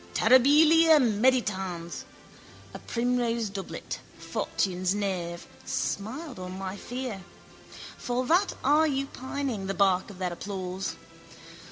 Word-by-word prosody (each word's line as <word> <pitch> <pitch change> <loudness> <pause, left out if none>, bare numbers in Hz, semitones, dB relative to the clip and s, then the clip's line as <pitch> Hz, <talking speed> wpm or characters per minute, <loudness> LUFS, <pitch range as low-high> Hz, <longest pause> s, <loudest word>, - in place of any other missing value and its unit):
Terribilia 305 +6 +6
meditans. 205 -8 0 0.7
A - - -7
primrose 235 -2 -1
doublet, 195 -1 -6 0.2
fortune's 185 0 -1
knave, 180 -4 -3 0.2
smiled 250 - -3
on 185 0 -6
my 190 0 -5
fear. 245 -2 -5 0.8
For 250 +1 -1
that 360 +8 +3
are 300 +4 +4
you 275 -2 0
pining, 260 -6 -4
the 195 - -2
bark 190 0 +2
of 200 - -11
their 180 -2 -2
applause? 190 0 -4
215 Hz, 110 wpm, -28 LUFS, 190-260 Hz, 0.8 s, Terribilia